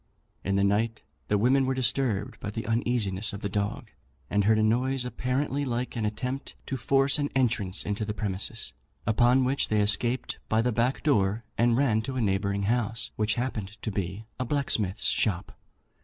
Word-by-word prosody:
In 100 - 0
the 100 - +3
night 110 +3 +1 0.2
the 105 - +2
women 130 +5 +3
were 130 - +1
disturbed 125 -4 0
by - - -4
the 110 +2 -4
uneasiness 110 -3 0
of 100 - -6
the 100 - -2
dog, 100 +1 -2 0.4
and 100 -1 +2
heard 110 +1 +5
a 110 - +3
noise 125 +4 +1
apparently 130 +3 -1
like 125 -1 -2
an 115 -2 -1
attempt 125 +6 -4
to 135 - -3
force 135 +2 +2
an 145 0 0
entrance 110 -7 +1
into 105 +1 -2
the 105 0 -3
premises, 105 +2 -3 0.3
upon 120 +4 +4
which 135 +2 0
they 110 - +2
escaped 115 +5 +1
by 110 - +3
the 125 - +1
back 120 +4 0
door, 105 -6 +2
and 120 0 +3
ran 120 -6 +3
to 130 +4 -5
a 130 - 0
neighbouring 100 -1 0
house, 115 +1 -1
which 105 0 +1
happened 110 -4 -3
to 110 - -2
be 95 +2 -3
a - - +1
blacksmith's 115 -7 -1
shop. 95 -4 0
115 Hz, 185 wpm, -28 LUFS, 105-125 Hz, 0.4 s, heard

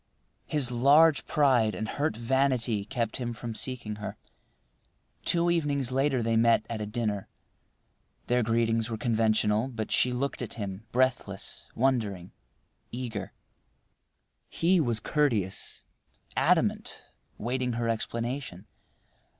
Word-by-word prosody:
His 140 -5 +2
large 145 +5 +5
pride 125 -7 +3
and 110 - -3
hurt 145 -1 -1
vanity 120 -3 +1
kept 115 0 -2
him 120 -2 -3
from 115 0 -6
seeking 110 -3 -4
her. 105 - -6 1.1
Two 170 0 +3
evenings 145 -6 0
later 135 -2 +1
they 115 0 +1
met 115 0 +4
at 110 -2 -3
a 105 - -3
dinner. 105 -3 -2 1.0
Their 125 0 +2
greetings 115 0 +1
were 110 - -3
conventional, 110 0 +2
but 115 -5 -5
she 125 - +3
looked 130 +3 -2
at 120 - -4
him, 100 0 -6
breathless, 125 -6 -1
wondering, 110 -8 0 0.6
eager. 115 -5 -5 1.2
He 180 +2 +2
was 120 -6 0
courteous, 110 - -1 0.5
adamant, - - +1 0.3
waiting 125 +2 -1
her 115 0 -1
explanation. 115 -2 -3
120 Hz, 120 wpm, -28 LUFS, 110-130 Hz, 1.2 s, large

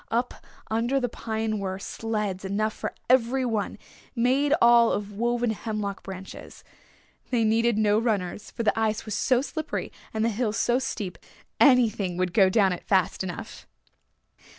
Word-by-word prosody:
Up 240 +2 0 0.4
under 235 +5 +1
the 250 - 0
pine 220 -1 -3
were 190 -1 -3
sleds 210 -2 -3
enough 210 +3 -1
for - - -5
every 255 +1 +3
one, 220 -4 -2 0.4
made 260 +4 +2
all 235 -1 +6
of 205 0 -3
woven 240 +2 0
hemlock 210 -2 -4
branches. 190 0 -10 0.7
They 240 -3 +2
needed 225 +1 +2
no 210 0 +3
runners 210 -3 -2
for 230 - -4
the 225 - +1
ice 220 -1 0
was 215 - -4
so 255 +5 +2
slippery 315 +1 -4 0.2
and 220 0 0
the - - +2
hill 220 0 -1
so 240 +3 +2
steep 210 -8 -4 0.4
anything 225 -9 +4
would 180 -1 -1
go 195 -3 +5
down 195 -2 +3
it 180 - -7
fast 190 -1 +1
enough. 180 -2 -7
220 Hz, 155 wpm, -26 LUFS, 200-240 Hz, 0.7 s, all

